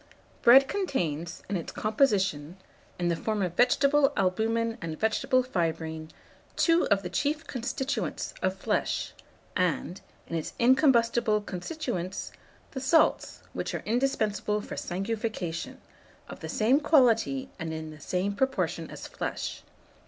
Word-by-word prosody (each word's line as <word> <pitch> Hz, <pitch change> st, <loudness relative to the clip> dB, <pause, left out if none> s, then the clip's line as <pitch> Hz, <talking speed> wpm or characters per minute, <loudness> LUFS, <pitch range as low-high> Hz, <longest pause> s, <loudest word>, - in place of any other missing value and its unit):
Bread 265 Hz, +3 st, +8 dB
contains, 175 Hz, -, -2 dB
in 205 Hz, -, -2 dB
its 170 Hz, -, -4 dB
composition, 195 Hz, -, +1 dB, 0.4 s
in 175 Hz, -1 st, 0 dB
the 170 Hz, -, +1 dB
form 210 Hz, +3 st, -1 dB
of 180 Hz, -2 st, -2 dB
vegetable 275 Hz, +4 st, +4 dB
albumen 225 Hz, +5 st, 0 dB
and 160 Hz, -2 st, -5 dB
vegetable 220 Hz, +4 st, +2 dB
fibrine, 160 Hz, -7 st, -2 dB, 0.5 s
two 335 Hz, 0 st, +3 dB
of 200 Hz, -1 st, +2 dB
the 180 Hz, -, -4 dB
chief 295 Hz, -, -1 dB
constituents 260 Hz, +2 st, -3 dB
of -, -, 0 dB
flesh, -, -, -1 dB, 0.4 s
and, 180 Hz, 0 st, -1 dB, 0.2 s
in 165 Hz, -, -5 dB
its 160 Hz, -, -3 dB
incombustible 235 Hz, -4 st, +4 dB
constituents, 195 Hz, -, -4 dB, 0.4 s
the 265 Hz, -, -5 dB
salts 315 Hz, +5 st, +2 dB
which -, -, -3 dB
are -, -, -4 dB
indispensable 215 Hz, -3 st, 0 dB
for -, -, -7 dB
sanguification, 195 Hz, -2 st, -3 dB, 0.5 s
of -, -, -9 dB
the -, -, -7 dB
same 240 Hz, +6 st, +3 dB
quality 265 Hz, -2 st, +3 dB
and 160 Hz, -1 st, -4 dB
in 160 Hz, 0 st, -5 dB
the 155 Hz, -, -12 dB
same 185 Hz, +6 st, -1 dB
proportion 265 Hz, +5 st, -1 dB
as -, -, -8 dB
flesh. -, -, -4 dB
215 Hz, 130 wpm, -28 LUFS, 180-265 Hz, 0.5 s, Bread